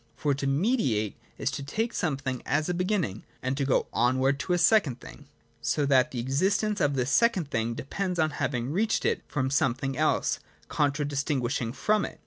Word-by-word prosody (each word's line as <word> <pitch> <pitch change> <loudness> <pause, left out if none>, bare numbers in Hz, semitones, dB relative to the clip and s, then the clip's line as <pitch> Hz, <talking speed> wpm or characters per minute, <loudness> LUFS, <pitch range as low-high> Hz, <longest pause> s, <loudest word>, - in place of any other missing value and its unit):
For 145 -2 0
to 140 0 -2
mediate 135 - +1 0.2
is - - -1
to - - -4
take 220 +12 -2
some 155 -6 0
thing 130 -2 -4
as 150 +3 0
a 180 - 0
beginning 180 - -1 0.2
and 130 +1 0
to 140 0 -1
go 135 - +2
onward 130 +3 +2
to 180 - -1
a - - +3
second 170 - +3
thing; 145 - -13 0.3
so 150 - +1
that 130 -2 +4
the 130 - -7
existence 190 - +1
of 145 -2 +2
this 130 0 0
second 190 -7 +2
thing 115 +1 -1
de - - -5
pends 180 +6 -3
on 155 -1 +2
our - - -9
having 125 -1 -1
reached 215 +7 +1
it - - +1
from 130 -2 -1
something 135 0 0
else - - +1 0.3
contradistinguished 140 -2 0
from 215 +5 +1
it. - - -9
140 Hz, 195 wpm, -27 LUFS, 130-180 Hz, 0.3 s, that